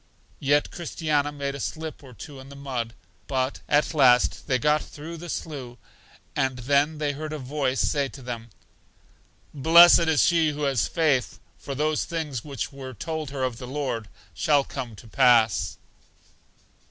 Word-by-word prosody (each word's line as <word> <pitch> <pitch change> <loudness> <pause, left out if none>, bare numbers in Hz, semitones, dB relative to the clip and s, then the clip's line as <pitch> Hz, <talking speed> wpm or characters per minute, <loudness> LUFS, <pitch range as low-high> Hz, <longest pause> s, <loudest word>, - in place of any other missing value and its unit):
Yet 145 +1 +2
Christiana 155 -4 -1
made 140 -1 -4
a 140 - -7
slip 160 +1 -5
or 130 - -12
two 135 +7 -10
in 135 +1 -12
the 140 - -11
mud; 125 -5 -4 0.3
but 130 0 -1
at 150 +3 +2
last 125 -5 +4
they 130 - +2
got 150 +4 +2
through 160 +3 -9
the 175 +1 -9
slough, 130 -8 -6 0.6
and 130 -1 0
then 140 +5 +1
they 150 -1 0
heard 150 +2 -6
a 155 - -3
voice 135 -1 -2
say 140 -2 +1
to 135 0 -12
them: 120 -1 -6 1.0
Blest 165 +5 +8
is 160 -3 +3
she 165 -3 +3
who 150 +1 -4
hath 135 -5 +1
faith, 145 -7 +1 0.2
for 140 - -6
those 155 +1 0
things 150 -8 -4
which 140 -2 -5
were 130 -2 -8
told 155 - -4
her 135 -1 -4
of 125 -3 -2
the 125 - -7
Lord 130 -5 -3 0.3
shall 145 -2 +2
come 125 -5 -6
to 115 - -14
pass. 115 -8 +3
140 Hz, 165 wpm, -25 LUFS, 130-150 Hz, 1.0 s, Blest